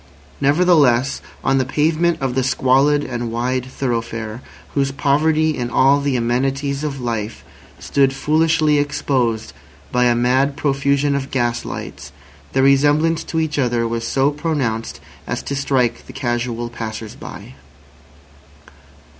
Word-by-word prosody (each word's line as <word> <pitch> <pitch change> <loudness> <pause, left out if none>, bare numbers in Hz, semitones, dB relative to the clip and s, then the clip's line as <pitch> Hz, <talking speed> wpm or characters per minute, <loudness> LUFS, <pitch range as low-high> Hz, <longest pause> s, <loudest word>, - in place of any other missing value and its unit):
Nevertheless, 140 -4 +3 0.2
on 135 0 +2
the - - +2
pavement 155 +5 +1
of 130 -2 0
the 130 - +1
squalid 135 +3 +3
and 120 -3 -4
wide 125 +2 -1
thoroughfare, 115 -3 -3 0.3
whose 135 -1 +1
poverty 155 +3 +2
in 120 -1 -3
all 135 +4 +4
the 140 -2 0
amenities 135 +4 -1
of 140 -3 -3
life 115 -3 -4 0.3
stood 135 -1 +1
foolishly 155 +1 +2
exposed 125 - -1 0.4
by 125 0 +2
a 120 -1 +3
mad 130 +4 +2
profusion 140 0 +1
of 140 0 -3
gas 120 -2 -1
lights, 70 +2 -7 0.4
their 135 - +2
resemblance 145 +4 +3
to 160 - -2
each 155 -2 -1
other 120 -3 +1
was 115 0 -3
so 135 +4 +1
pronounced 145 -8 -2 0.3
as - - -3
to 140 - -3
strike 130 -3 0
the - - -10
casual 120 -1 -2
passers 110 -2 -6
by. - - -10
135 Hz, 135 wpm, -19 LUFS, 120-145 Hz, 0.4 s, all